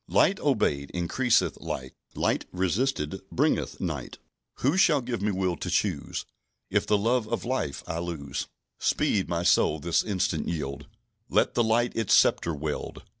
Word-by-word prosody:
"Light 195 Hz, -, +3 dB
obeyed 75 Hz, -, +1 dB
increaseth 120 Hz, +8 st, +1 dB
light; 65 Hz, 0 st, -5 dB, 0.2 s
Light -, -, 0 dB
resisted 95 Hz, -, -1 dB
bringeth -, -, 0 dB
night; -, -, -4 dB, 0.4 s
Who 140 Hz, +6 st, +1 dB
shall 165 Hz, -6 st, +5 dB
give 120 Hz, -3 st, -4 dB
me 105 Hz, -, +1 dB
will 95 Hz, -2 st, 0 dB
to -, -, -4 dB
choose -, -, -1 dB, 0.5 s
If -, -, +1 dB
the 105 Hz, -, +4 dB
love 115 Hz, +2 st, +1 dB
of -, -, -2 dB
light 120 Hz, -, -2 dB
I 80 Hz, -, -3 dB
lose? 80 Hz, -5 st, -4 dB, 0.3 s
"Speed, 100 Hz, -3 st, +1 dB
my 85 Hz, 0 st, -1 dB
soul, 80 Hz, -3 st, +3 dB
this 85 Hz, +3 st, +1 dB
instant 95 Hz, -6 st, -1 dB
yield; 75 Hz, -3 st, -4 dB, 0.4 s
Let -, -, +2 dB
the 120 Hz, -, +3 dB
light 115 Hz, +2 st, +1 dB
its 115 Hz, -4 st, +3 dB
sceptre 85 Hz, -2 st, +3 dB
wield. 75 Hz, 0 st, -4 dB
95 Hz, 155 wpm, -27 LUFS, 80-120 Hz, 0.5 s, shall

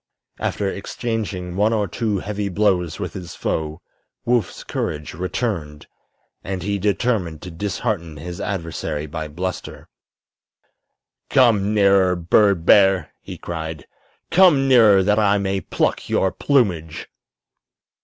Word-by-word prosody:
After 100 Hz, -, -1 dB
exchanging 100 Hz, -3 st, -4 dB
one 105 Hz, +3 st, +2 dB
or 105 Hz, -2 st, 0 dB
two 105 Hz, +3 st, -1 dB
heavy 100 Hz, +1 st, -3 dB
blows 90 Hz, -4 st, 0 dB
with -, -, -4 dB
his 90 Hz, -3 st, -8 dB
foe 80 Hz, +1 st, -3 dB, 0.4 s
Woof's 120 Hz, -5 st, 0 dB
courage 75 Hz, 0 st, -4 dB
returned, 85 Hz, -4 st, -3 dB, 0.6 s
and 95 Hz, -2 st, -4 dB
he 100 Hz, +1 st, -1 dB
determined 100 Hz, -5 st, -1 dB
to 90 Hz, -, -7 dB
dishearten 90 Hz, -2 st, -3 dB
his 85 Hz, +3 st, -7 dB
adversary 80 Hz, -5 st, -3 dB
by 80 Hz, +1 st, -5 dB
bluster. 90 Hz, +5 st, -6 dB, 1.4 s
"Come 110 Hz, -5 st, +3 dB
nearer, 100 Hz, -2 st, +4 dB
bird 90 Hz, +1 st, +2 dB
bear!" 95 Hz, -5 st, +4 dB
he -, -, -9 dB
cried. 80 Hz, -3 st, -6 dB, 0.5 s
"Come 165 Hz, -7 st, +5 dB
nearer, 110 Hz, -7 st, +6 dB
that 105 Hz, +2 st, +2 dB
I 100 Hz, -1 st, +3 dB
may 95 Hz, -1 st, -1 dB
pluck -, -, -1 dB
your 95 Hz, -, +2 dB
plumage!" 90 Hz, -, 0 dB
95 Hz, 120 wpm, -21 LUFS, 85-105 Hz, 1.4 s, nearer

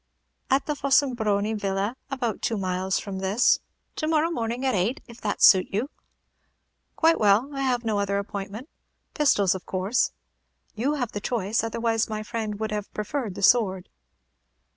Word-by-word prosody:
"At 270 Hz, +1 st, +2 dB
the 300 Hz, -, -2 dB
Fossombroni 240 Hz, -7 st, +1 dB
Villa, 200 Hz, +2 st, -2 dB
about 245 Hz, -6 st, -2 dB
two 225 Hz, -, -1 dB
miles 185 Hz, 0 st, -1 dB
from 195 Hz, -2 st, -5 dB
this. 195 Hz, +5 st, +3 dB, 0.4 s
To 310 Hz, -, -1 dB
morrow 320 Hz, +1 st, +2 dB
morning, 240 Hz, -2 st, -2 dB
at 260 Hz, -, +2 dB
eight, 205 Hz, +7 st, 0 dB
if 235 Hz, 0 st, -13 dB
that -, -, -2 dB
suit 185 Hz, -2 st, +7 dB
you." 230 Hz, +9 st, -2 dB, 1.0 s
"Quite 330 Hz, 0 st, +3 dB
well. 215 Hz, +6 st, +3 dB
I 275 Hz, -, -2 dB
have 250 Hz, -3 st, 0 dB
no 215 Hz, -2 st, 0 dB
other 200 Hz, 0 st, 0 dB
appointment. 200 Hz, +4 st, -5 dB, 0.5 s
Pistols, 205 Hz, -, +3 dB
of 190 Hz, -, -8 dB
course?" 190 Hz, +6 st, 0 dB, 0.6 s
"You 265 Hz, +7 st, 0 dB
have 245 Hz, -6 st, -2 dB
the 205 Hz, -, -5 dB
choice, 220 Hz, -1 st, -1 dB
otherwise 225 Hz, 0 st, 0 dB
my 215 Hz, 0 st, -3 dB
friend 215 Hz, -2 st, -4 dB
would 220 Hz, -1 st, -2 dB
have 210 Hz, -1 st, -4 dB
preferred 210 Hz, -1 st, -3 dB
the 200 Hz, -, -6 dB
sword." 190 Hz, -5 st, +3 dB
220 Hz, 165 wpm, -25 LUFS, 200-255 Hz, 1.0 s, suit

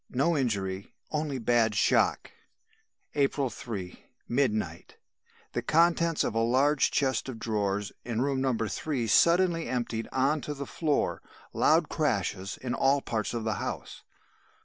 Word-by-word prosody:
No 140 Hz, +7 st, +1 dB
injury, 100 Hz, -8 st, -2 dB, 0.2 s
only 150 Hz, -3 st, -1 dB
bad 115 Hz, -2 st, +2 dB
shock. -, -, +2 dB, 0.8 s
"April 140 Hz, -2 st, +1 dB
3, 100 Hz, -5 st, -7 dB, 0.2 s
midnight. 110 Hz, -, -1 dB, 0.6 s
The -, -, -1 dB
contents 170 Hz, 0 st, +3 dB
of -, -, -1 dB
a 115 Hz, -, 0 dB
large 135 Hz, +5 st, +3 dB
chest 130 Hz, -2 st, 0 dB
of 125 Hz, -, -6 dB
drawers 105 Hz, -3 st, -1 dB
in 115 Hz, -2 st, -3 dB
room 135 Hz, -1 st, 0 dB
No. 135 Hz, -1 st, +2 dB
3 120 Hz, +4 st, -2 dB
suddenly 170 Hz, -, +3 dB
emptied 120 Hz, -2 st, -2 dB
on 140 Hz, +3 st, +1 dB
to 150 Hz, -, -5 dB
the 140 Hz, 0 st, -5 dB
floor. 150 Hz, +1 st, -1 dB, 0.3 s
Loud -, -, +3 dB
crashes 95 Hz, +1 st, -1 dB
in 125 Hz, -2 st, -4 dB
all 135 Hz, +1 st, +3 dB
parts 115 Hz, -1 st, -2 dB
of 115 Hz, -, -2 dB
the 110 Hz, -1 st, 0 dB
house. -, -, -5 dB
130 Hz, 140 wpm, -28 LUFS, 110-145 Hz, 0.8 s, contents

